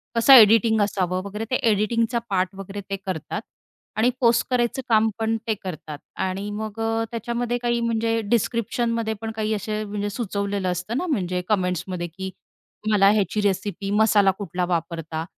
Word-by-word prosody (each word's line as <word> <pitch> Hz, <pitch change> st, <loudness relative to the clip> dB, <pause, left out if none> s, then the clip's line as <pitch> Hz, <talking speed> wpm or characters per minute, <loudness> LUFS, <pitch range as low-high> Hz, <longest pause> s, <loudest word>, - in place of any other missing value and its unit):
कसं 230 Hz, +4 st, +7 dB
एडिटिंग 220 Hz, -2 st, +7 dB
असावं 185 Hz, -3 st, 0 dB
वगैरे, 210 Hz, +3 st, -5 dB
ते -, -, +3 dB, 0.2 s
एडिटिंगचा 230 Hz, +3 st, +1 dB
पार्ट 185 Hz, -2 st, +1 dB
वगैरे 195 Hz, +1 st, -7 dB
ते 195 Hz, -, -1 dB
करतात 185 Hz, -6 st, -4 dB, 0.6 s
आणि 225 Hz, +3 st, +4 dB
पोस्ट 235 Hz, -1 st, +4 dB
करायचं 250 Hz, +1 st, +1 dB
काम 220 Hz, -1 st, +4 dB
पण 225 Hz, 0 st, +1 dB
ते 220 Hz, -, +2 dB
करतात. 155 Hz, -5 st, -6 dB, 0.2 s
आणि 190 Hz, +2 st, -2 dB
मग 215 Hz, +1 st, -5 dB
अ, 225 Hz, 0 st, 0 dB
त्याच्यामध्ये 235 Hz, +1 st, -2 dB
काही 240 Hz, 0 st, 0 dB
म्हणजे 230 Hz, 0 st, 0 dB
डिस्क्रिप्शनमध्ये 230 Hz, +1 st, 0 dB
पण 225 Hz, 0 st, -3 dB
काही 220 Hz, 0 st, -1 dB
असे 215 Hz, +1 st, -2 dB
म्हणजे 205 Hz, 0 st, -3 dB
सुचवलेलं 200 Hz, -3 st, -2 dB
असतं 180 Hz, +7 st, -3 dB
ना 360 Hz, -, -1 dB
म्हणजे 185 Hz, -, -1 dB
कमेंट्समध्ये 180 Hz, -3 st, -1 dB
की 190 Hz, +3 st, -6 dB, 0.5 s
तुम्हाला 210 Hz, -2 st, +4 dB
ह्याची 210 Hz, 0 st, +1 dB
रेसिपी, 200 Hz, 0 st, -1 dB
मसाला 205 Hz, -2 st, +4 dB
कुठला 180 Hz, -3 st, -2 dB
वापरता, 165 Hz, -2 st, -3 dB
210 Hz, 155 wpm, -23 LUFS, 190-225 Hz, 0.6 s, कसं